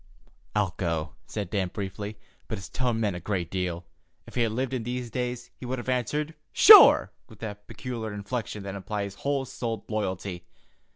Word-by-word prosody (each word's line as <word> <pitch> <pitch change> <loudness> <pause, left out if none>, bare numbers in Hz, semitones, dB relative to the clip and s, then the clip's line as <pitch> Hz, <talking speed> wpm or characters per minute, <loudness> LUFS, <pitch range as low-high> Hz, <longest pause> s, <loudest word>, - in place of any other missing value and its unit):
"I'll 100 -4 +1
go," 80 -3 -2
said 100 -5 -4
Dan 100 -3 +1
briefly, 100 +2 -5 0.3
but 110 - -3
his 95 - -8
tone 125 -3 0
meant 105 -5 0
a - - -4
great 90 -2 -2
deal. 90 -2 -2 0.4
If - - -13
he 125 - 0
had 115 -2 +2
lived 130 +3 -2
in 130 - -1
these 120 0 -4
days, 125 0 -3
he - - -13
would 130 +1 -2
have 120 - -5
answered 145 +5 -1 0.2
"Sure!" - - +9 0.2
with 110 - -14
that 105 -2 -7
peculiar 115 -4 -5
inflection 105 0 -4
that 100 -1 -5
implies 100 0 -4
whole 140 +5 -1
souled 115 -4 -4
loyalty. 95 -4 -3
105 Hz, 180 wpm, -27 LUFS, 95-125 Hz, 0.4 s, Sure